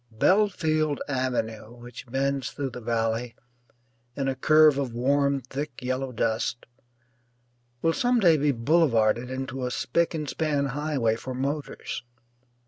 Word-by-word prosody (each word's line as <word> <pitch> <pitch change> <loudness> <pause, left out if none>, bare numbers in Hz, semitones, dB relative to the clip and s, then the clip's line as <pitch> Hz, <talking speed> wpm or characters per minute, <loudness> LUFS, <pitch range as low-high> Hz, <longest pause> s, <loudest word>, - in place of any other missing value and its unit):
Belfield 155 - +2
Avenue, 120 -4 -2
which 120 +1 -11
bends 135 -1 -1
through 135 +3 -4
the 125 - -8
valley 115 +1 -1 0.8
in 135 -1 -2
a 135 - +1
curve 155 +1 +5
of 130 -4 -2
warm 140 +2 +2
thick 135 +2 -6
yellow 130 +1 -2
dust, 115 +1 -1 1.2
will 165 - +3
some 245 +6 +2
day 175 -6 +5
be 145 -1 +2
boulevarded 120 -3 +2
into 130 0 -4
a 125 - -1
spick 165 +8 0
and 155 -2 -3
span 150 -3 0
highway 140 -4 0
for 130 +2 -6
motors. 140 +3 -4
135 Hz, 135 wpm, -26 LUFS, 120-150 Hz, 1.2 s, curve